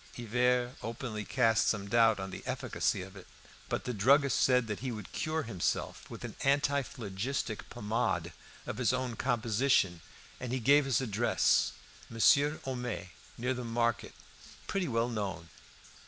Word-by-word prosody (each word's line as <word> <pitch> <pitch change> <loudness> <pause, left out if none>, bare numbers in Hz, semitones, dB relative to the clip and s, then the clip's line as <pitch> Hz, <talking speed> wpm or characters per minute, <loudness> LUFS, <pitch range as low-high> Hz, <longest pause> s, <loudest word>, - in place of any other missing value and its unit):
Hivert 125 +2 +1
openly 115 -2 -4
cast 115 -1 +2
some 100 -2 0
doubt 115 -1 +4
on 95 0 -5
the - - -7
efficacy 95 - -1
of 95 +1 -12
it. 95 - -12 0.4
But - - -2
the 125 - -3
druggist 135 +6 +4
said 125 -2 +4
that 105 -2 -4
he 130 +2 -3
would 105 -4 -7
cure 155 0 -1
himself 105 -9 -2
with - - -9
an - - -7
antiphlogistic 135 -5 -1
pomade 105 -7 -1 0.3
of - - -5
his 125 0 +2
own 125 -2 -2
composition, 115 -6 +1 0.4
and 125 -2 -5
he 130 - 0
gave 140 +4 +5
his 135 -1 +1
address 115 -1 +2 0.4
"Monsieur 140 +6 +4
Homais, 125 -7 -4 0.3
near 125 +2 0
the 125 0 -5
market, 115 0 -1 0.5
pretty 195 -3 -1
well 115 -2 +1
known." 95 -7 -4
120 Hz, 150 wpm, -31 LUFS, 105-130 Hz, 0.5 s, gave